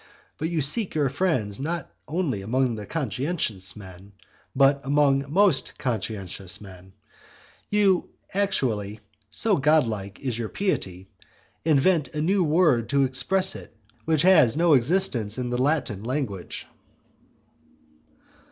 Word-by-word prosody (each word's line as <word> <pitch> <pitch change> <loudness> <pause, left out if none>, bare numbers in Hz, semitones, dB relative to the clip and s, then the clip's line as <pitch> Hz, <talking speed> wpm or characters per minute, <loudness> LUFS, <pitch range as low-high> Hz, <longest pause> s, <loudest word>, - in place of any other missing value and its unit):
But 160 - -2
you 165 -4 -1
seek 190 - +2
your 145 -3 +1
friends 130 - -1
not 160 +2 -4 0.2
only 150 - -2
among 115 +1 -1
conscientious 125 - -1
men, 95 0 -13 0.4
but 140 +1 +3
among 140 0 +1
most 185 -4 +2
conscientious 100 -5 -3
men. 95 -3 -11
And 95 - -19 0.8
you 200 -3 +2 0.2
actually, 120 - -1 0.3
so 200 - +3
godlike 115 -10 +1
is 125 -4 -4
your 110 -2 -3
piety, 95 - -3 0.6
invent 155 -1 +2
a - - -2
new 190 +4 +2
word 150 -8 +2
to 140 -1 +2
express 185 +9 +1
it - - -12 0.3
which 160 -2 +1
has 160 -10 +5
no 170 -1 +4
existence 125 - +2
in 125 -1 -3
the 125 +1 -1
Latin 130 -8 -1
language. 120 -8 -4
135 Hz, 125 wpm, -25 LUFS, 110-160 Hz, 0.8 s, has